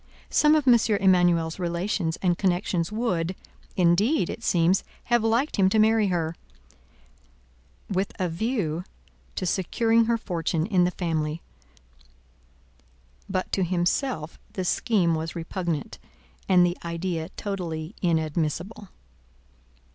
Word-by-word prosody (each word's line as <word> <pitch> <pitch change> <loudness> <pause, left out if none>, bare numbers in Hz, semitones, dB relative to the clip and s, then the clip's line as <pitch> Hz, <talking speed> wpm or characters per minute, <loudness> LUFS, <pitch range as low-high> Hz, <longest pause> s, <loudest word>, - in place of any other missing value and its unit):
Some 300 0 +5
of 300 -3 +1
M. 240 -2 +7 0.2
Emanuel's 175 -3 +3
relations 175 -1 -1
and 175 -2 +3
connections 180 -1 0
would, 190 -6 -1 0.4
indeed, 185 - +2
it 230 - -8
seems, 175 +1 +2 0.2
have 240 -2 +2
liked 230 +6 +1
him 190 -2 +4
to 220 - +1
marry 220 0 +4
her, 170 -3 -1 1.5
with 195 0 -1
a 185 - +1
view 175 -3 -2 0.5
to 185 - -2
securing 225 +6 +2
her 230 0 +1
fortune 165 -6 -2
in 185 -3 +3
the - - +2
family; 160 -3 -2 1.9
but 185 -1 -2
to 190 - +1
himself 175 - -1
the 185 - -3
scheme 180 -3 +2
was 160 0 -3
repugnant, 170 -3 -4 0.5
and 180 -2 +6
the 175 0 -2
idea 170 -1 -3
totally 175 -4 -4
inadmissible. 170 +5 -1
180 Hz, 115 wpm, -25 LUFS, 165-210 Hz, 1.9 s, M